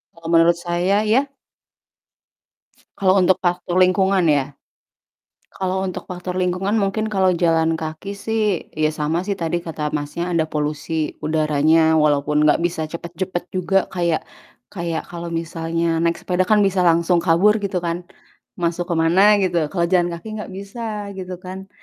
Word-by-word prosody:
Kalau 165 -1 -11
menurut 165 +1 +5
saya 175 +4 0
ya. 265 +6 +3 1.7
Kalo 185 -1 +3
untuk 185 0 +4
faktor 175 0 0
lingkungan 185 0 +3
ya? 145 -3 +1 0.9
Kalo 190 0 -2
untuk 185 -2 -5
faktor 180 0 -5
lingkungan 185 +4 0
mungkin 215 +2 -1
kalo 190 -3 +2
jalan 165 -1 +2
kaki 160 +5 -5
sih, 210 -2 -1
ya 155 0 -1
sama 160 +5 -1
sih 200 - 0
tadi 170 -2 -2
kata 160 -3 -4
Masnya 150 +4 -3
ada 165 -2 +1
polusi 150 +1 -3
udaranya, 155 +1 +2
walaupun 150 0 +2
gak 150 +3 +3
bisa 170 -2 -1
cepet-cepet 175 +2 -5
juga 185 +1 +1
kayak, 170 -3 0 0.5
kayak 170 -3 -3
kalo 170 0 -6
misalnya 165 0 -1
naik 170 0 +1
sepeda 185 0 0
kan 210 0 +4
bisa 190 -2 +2
langsung 170 +1 +3
kabur 180 +6 +3
gitu 195 -3 -2
kan, 175 +1 -3 0.5
masuk 175 +1 -2
kemana 180 +5 +4
gitu, 175 -5 0
kalo 170 0 0
jalan 175 0 +2
kaki 170 - -12
gak - - -8
bisa 205 0 -6
gitu 185 -1 -6
kan, 190 +1 -9
175 Hz, 150 wpm, -21 LUFS, 165-190 Hz, 1.7 s, menurut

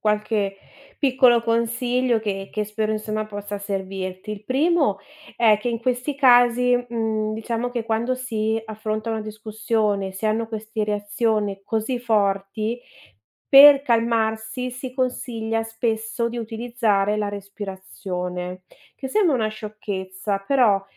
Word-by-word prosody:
qualche 210 -2 0 0.4
piccolo 255 -4 +4
consiglio 235 +1 +1
che 195 -3 -4
che 210 -1 -1
spero, 215 +1 -2
insomma, 215 0 -2
possa 205 -1 -6
servirti. 190 0 -4
Il 210 0 -9
primo 285 - +2 0.4
è 220 -3 +5
che 240 +3 -3
in 230 -1 -1
questi 255 +3 -1
casi, 245 -2 +5
mhmm, 220 -2 -1
diciamo 230 +2 -3
che 240 -2 -3
quando 230 +3 0
si 225 -3 -1
affronta 215 0 -4
una 220 -1 -2
discussione, 215 -2 -1
si 190 +3 -4
hanno 220 +1 0
queste 220 0 -4
reazioni 205 -1 -1
così 225 +4 -2
forti, 215 +1 0 0.7
per 275 0 +9
calmarsi 230 0 0
si 255 0 -7
consiglia 230 -3 -2
spesso 225 +1 -2
di 235 +1 -5
utilizzare 225 -3 0
la 210 -1 -1
respirazione, 190 -2 -6 0.3
che 265 - -5
sembra 340 -1 +3
una 220 -3 +1
sciocchezza, 200 -2 -5
però 220 -7 +4
220 Hz, 125 wpm, -23 LUFS, 205-240 Hz, 0.7 s, per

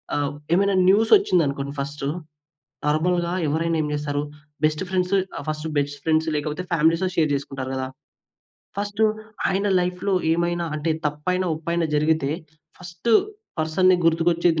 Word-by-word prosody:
ఆహ్, 145 -1 0 0.2
ఏమైనా 200 +2 +3
న్యూసొచ్చిందనుకోండి 180 - +3
ఫస్ట్, 140 0 -4 0.8
నార్మల్‌గా 170 +3 +1
ఎవరైనా 165 +2 0
ఏం 150 - -1
జేస్తారు? 145 -1 -2 0.4
బెస్ట్ 155 +3 0
ఫ్రెండ్స్ 185 0 0 0.2
ఆహ్, - - -5
ఫస్ట్ 155 +1 -3
బెస్ట్ 145 0 -1
ఫ్రెండ్స్ 160 0 +2
లేకపోతే 150 +4 -2
ఫ్యామిలీస్‌తో 165 +3 +2
షేర్ 155 -3 +2
జేసుకుంటారు 135 -1 -5
గదా! 130 0 -2 0.9
ఫస్ట్ 205 +1 -3 0.5
ఆయన 195 +2 0
లైఫ్‌లో 180 +2 -1 0.2
ఏమైనా 170 +1 0
అంటే 155 +2 -1 0.2
తప్పైనా 180 +5 -1
ఒప్పైనా 170 +1 -1
జరిగితే, 150 -1 +2 0.5
ఫస్ట్ 180 +5 -4 0.5
పర్సన్‌ని 180 +4 +3
గుర్తుకొచ్చేది 165 0 +3
165 Hz, 125 wpm, -23 LUFS, 150-180 Hz, 0.9 s, ఏమైనా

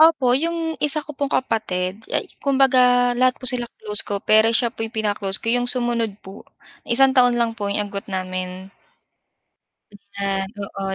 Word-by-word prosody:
Opo, 310 -6 +5
'yung 325 +3 -1
isa 300 +1 +1
ko 300 - -8
pong 280 0 -3
kapatid, 210 -5 -2
ay - - -1 0.2
kumbaga, 255 -3 +4
lahat 255 +1 +2
po - - -13
sila 250 -2 +1
close 210 -1 -2
ko, 200 -1 -4
pero 220 +1 +5
siya 230 0 +1
po - - -14
'yung 225 - -2
pinaka-close 205 -3 0
ko, 230 +1 -2
'yung 245 0 +1
sumunod 235 -4 0
po, 190 +1 -12 0.4
1 265 +2 +4
taon 245 -2 +4
lang 235 -1 +1
po 210 -3 -4
'yung 205 0 -2
agwat 200 - -6
namin. 185 0 -5 1.5
Ayan. 195 -1 -1
Oo, 195 -1 -5
230 Hz, 170 wpm, -21 LUFS, 200-255 Hz, 1.5 s, Opo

